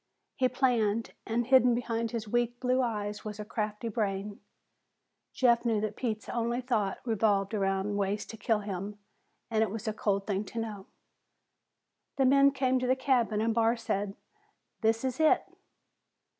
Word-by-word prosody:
He 255 -2 +2
planned, 230 -4 +1
and 235 +1 0
hidden 250 -1 +5
behind 230 -1 -2
his 225 -2 -4
weak 240 +2 0
blue 255 0 +2
eyes 210 -4 -2
was 215 0 -6
a 210 - -5
crafty 210 +1 -3
brain. 205 -2 -2 0.9
Jeff 235 -2 +3
knew 225 -3 +1
that 210 0 -3
Pete's 220 -4 -3
only 235 +1 -1
thought 225 -6 0
revolved 205 -3 +1
around 195 0 0
ways 200 +1 -1
to - - -9
kill 220 0 0
him, 200 0 -5 0.5
and 220 -1 +2
it 220 - +2
was 220 +2 -6
a 215 - 0
cold 200 -2 0
thing 200 -1 -1
to 230 +4 -5
know. 210 -4 -5 1.3
The 270 - +3
men 275 +1 +6
came 260 -2 +1
to 250 - -1
the 255 - +4
cabin 245 -5 +1
and 225 0 +1
Barr 230 +1 +2
said, 200 -3 -2 0.7
"This 225 +2 +2
is 260 -1 -2
hit." 315 -1 +4
225 Hz, 165 wpm, -30 LUFS, 210-245 Hz, 1.3 s, men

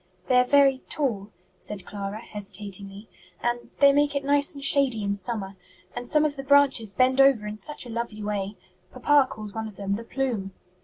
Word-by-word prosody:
"They 250 -1 +5
are - - +5
very 275 0 +4
tall," 225 -9 -1 0.3
said 205 -2 -4
Clara, 205 +1 -6
hesitatingly, 200 0 -8 0.4
"and 240 0 -2
they 280 0 +7
make 290 0 +2
it 280 - -1
nice 285 +1 +2
and 280 0 -3
shady 270 -6 +3
in 200 0 0
summer; 200 0 -5 0.4
and 245 0 -5
some 300 +3 +3
of 295 -2 -1
the 270 - -5
branches 270 -7 +3
bend 260 +2 +4
over 270 -6 +4
in 210 0 -4
such 290 +6 -5
a - - -9
lovely 225 -2 -4
way! 205 -1 -3 0.4
Papa 290 -2 +3
calls 210 -2 -8
one 220 0 -4
of 210 - -11
them 200 0 -3
'the 230 - -9
plume.'" 230 -8 -3
235 Hz, 195 wpm, -25 LUFS, 205-275 Hz, 0.4 s, they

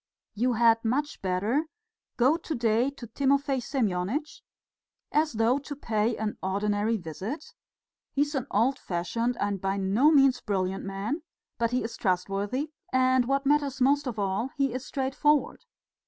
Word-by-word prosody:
You 245 +4 +1
had 230 0 +4
much 280 +6 -1
better 205 - 0 0.5
go 260 +6 +4
to 330 -2 -4
day 235 +2 +2
to 275 -3 -10
Timofey 275 +3 +1
Semyonitch, 245 - -2 0.7
as 305 0 +2
though 230 +4 +2
to 285 +1 -7
pay 225 -3 0
an 215 -1 -3
ordinary 205 +3 0
visit; 190 - -6 0.6
he 280 - +2
is 290 +1 -5
an 270 -2 -2
old 250 +6 +2
fashioned 230 +8 -2
and 200 -2 -1
by 195 +1 -1
no 200 +9 +3
means 275 -4 +5
brilliant 190 -2 -1
man, 200 - -3 0.4
but 230 0 +2
he 250 +1 0
is 225 - -5
trustworthy, 200 - -1 0.2
and 255 -1 +3
what 275 +2 0
matters 285 -2 +2
most 280 +2 +3
of 235 -3 -4
all, 200 +4 -1
he 275 -3 +1
is 255 0 -4
straightforward. 280 +2 0
240 Hz, 155 wpm, -27 LUFS, 205-275 Hz, 0.7 s, means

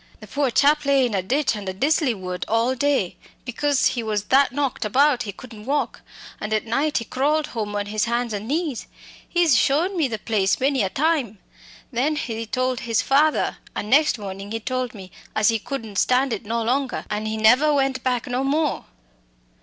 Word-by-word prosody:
The - - -11
poor 285 -2 0
chap 295 +5 +3
lay 275 -2 +3
in 240 - -2
a 195 - +1
ditch 255 +6 0
under 195 -3 -5
Disley 275 - +1
Wood 180 -1 -4
all 230 +3 +2
day, 270 -7 0 0.3
because 280 +3 +1
he 240 - -3
was 215 -2 -2
that 270 +5 +3
knocked 275 -1 -2
about 265 +5 +3
he - - -2
couldn't 220 0 -12
walk, 290 +1 -1 0.4
and 210 - -5
at 215 - -1
night 275 +6 0
he 230 - -2
crawled 295 +5 0
home 210 -3 -4
on 205 0 -1
his 210 +1 -1
hands 235 -1 -1
and 205 +1 -4
knees. 300 -2 -2 0.4
He's 345 -6 +3
shown 325 +11 +2
me 320 -6 +2
the 225 -3 -4
place 195 -3 0
many 270 0 +1
a 195 - 0
time! 280 - 0 0.5
Then 275 +5 0
he 230 -6 -4
told 255 +2 -1
his 230 -3 0
father, 295 +3 +2 0.2
and 210 - -4
next 300 0 +4
morning 195 -1 -7
he 225 - -2
told 255 +1 -3
me, 190 -3 -10 0.2
as 215 +1 +4
he 225 -1 +1
couldn't 225 -4 -6
stand 255 0 +2
it 210 - -5
no 230 +2 -1
longer, 255 +3 -1
an' 210 +1 -2
he 220 0 -2
never 250 +8 +5
went 270 -2 +1
back 250 -2 0
no 250 +1 -2
more." 295 +2 0
250 Hz, 200 wpm, -23 LUFS, 215-280 Hz, 0.5 s, never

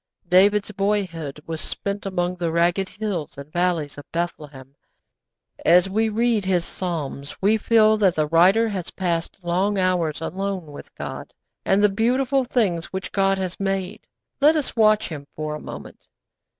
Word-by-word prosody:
David's 200 +4 +4
boyhood 185 -8 -2
was 160 -1 -5
spent 200 0 -4
among 180 -2 -1
the 170 -2 -1
rugged 175 +3 +1
hills 200 -10 -4
and 140 +2 -10
valleys 175 -5 0
of 145 - -14
Bethlehem. 150 -6 -5 0.9
As 175 +2 +5
we 220 +3 +1
read 225 -1 +1
his 180 -3 +1
Psalms 150 -6 -5
we 205 +3 +3
feel 220 0 +4
that 195 -4 +3
the 155 - +1
writer 180 +8 +4
has 190 -5 -4
passed 175 -3 -2
long 185 +4 0
hours 180 -5 +1
alone 185 -1 -4
with 145 - -12
God, - - -7 0.3
and 195 +2 +3
the - - +7
beautiful 250 +6 +1
things 200 -10 0
which 190 0 -6
God 195 -1 +2
has 185 -1 -4
made. 195 +1 -3 0.3
Let 300 +3 +5
us 300 -3 -2
watch 215 -1 +4
him 145 -3 -7
for 155 0 -3
a 150 - -5
moment. - - -10
185 Hz, 160 wpm, -23 LUFS, 165-210 Hz, 0.9 s, the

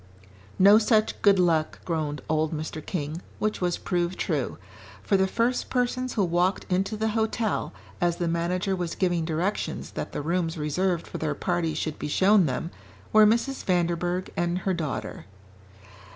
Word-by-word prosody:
"No 200 +3 +7
such 215 -1 +2
good 200 -1 +5
luck," 165 -4 +2
groaned 150 -5 -2
old 155 0 +1
Mr. 155 0 -5
King, 155 0 -4 0.2
which 215 -2 -1
was 175 -1 0
proved 175 0 -1
true. - - -1 0.5
For 200 - +2
the 190 0 +3
first 235 +5 0
persons 255 0 -1
who 210 - +2
walked 175 +3 +1
into 195 +4 0
the 220 +1 0
hotel, 220 0 -1 0.3
as 175 -1 +2
the 170 0 -2
manager 180 +3 0
was 175 -2 -3
giving 175 -3 0
directions 170 +6 -2
that - - -5
the - - -4
rooms 165 0 -1
reserved 170 +4 0
for - - -7
their 150 -2 -1
party 175 -2 -1
should 155 -2 -3
be - - -3
shown 190 +3 +4
them, 140 +6 -3 0.4
were 215 0 +8
Mrs. 235 +5 0
Vanderburgh 175 0 0
and 175 0 0
her 190 - +2
daughter. 155 - -4
180 Hz, 165 wpm, -26 LUFS, 165-200 Hz, 0.5 s, were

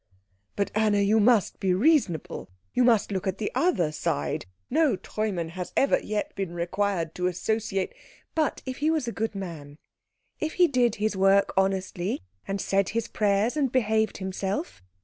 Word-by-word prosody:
"But, 200 - -1
Anna, 215 -1 +2
you 205 +2 +3
must 220 -1 +3
be 185 -2 +2
reasonable 215 - +1 0.2
you 250 - +3
must 230 -4 +3
look 190 -1 -2
at 190 0 -1
the 210 - -2
other 245 - +2
side. 75 - -2 0.2
No 300 -4 +3
Treumann 190 -3 -3
has 180 +1 -6
ever 275 - +4
yet 210 0 -3
been 190 -3 -4
required 175 -1 -1
to 180 0 -1
associate 195 +2 -1 0.2
" - - -31
"But 305 - -1
if 260 0 -4
he 300 +2 +1
was 315 -6 0
a - - -1
good 225 -1 -3
man? 160 -7 -7 0.6
If 315 +1 -2
he 360 -1 +5
did 245 -6 +2
his 215 0 -1
work 195 +1 +4
honestly, 190 - 0 0.2
and 195 0 -2
said 195 0 +1
his 230 +1 -2
prayers, 210 +4 +1
and 280 -5 +1
behaved 220 -4 +1
himself? 190 - -3
200 Hz, 170 wpm, -26 LUFS, 185-230 Hz, 0.6 s, he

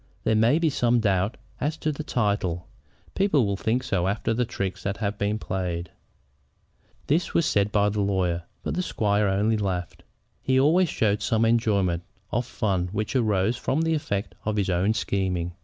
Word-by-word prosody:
There 110 - +2
may 115 +7 +4
be 165 -2 +2
some 120 -2 +2
doubt 100 -1 +1 0.2
as 150 +3 -1
to 155 - -1
the 150 +1 -5
title. 100 - -1 0.5
People 190 - +2
will 100 -1 0
think 115 +6 0
so 95 -6 0
after 105 +3 0
the 125 +2 +1
tricks 100 -4 -4
that 100 0 -2
have 105 -1 -3
been 105 +1 0
played." 90 -4 -3 1.1
This 160 +5 0
was 170 - +3
said 100 0 +2
by 105 0 +3
the 105 0 -1
lawyer; 95 -4 0 0.2
but - - -2
the 180 - 0
squire 105 - +1
only 105 +3 +2
laughed. 95 -4 -3 0.4
He 130 0 +2
always 165 +6 +4
showed 105 -4 +1
some 115 +1 +2
enjoyment 100 -7 +2 0.3
of 120 +1 0
the - - -16
fun 95 -4 0
which 105 +5 -3
arose 110 -2 +2
from 140 +5 0
the 165 0 +1
effects 100 -10 -2
of 105 0 -1
his 100 -3 0
own 95 +5 +2
scheming. 90 -4 -1
105 Hz, 185 wpm, -25 LUFS, 95-120 Hz, 1.1 s, may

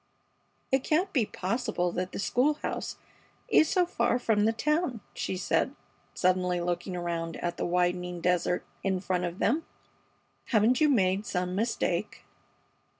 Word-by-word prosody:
"It 265 0 +3
can't 360 +5 +1
be 240 -8 +2
possible 205 -3 -1
that 180 +1 -3
the - - -6
school 260 +8 +2
house - - -3 0.5
is 315 - +5
so 365 -2 +3
far 295 -7 +1
from 220 -4 +2
the 225 - +4
town," 300 - 0
she 185 - -3
said, 180 - 0 0.4
suddenly 180 -1 +2
looking 175 +1 -2
around 170 -1 -3
at 175 0 -3
the - - -1
widening 180 0 0
desert 180 0 +1 0.2
in 190 -1 +1
front 180 -1 -1
of 175 +1 -4
them. 290 +13 +1 0.8
"Haven't 235 +3 +3
you 305 - +5
made 195 -5 +2
some 180 0 -1
mistake?" 225 +5 -1
190 Hz, 150 wpm, -29 LUFS, 180-245 Hz, 0.8 s, is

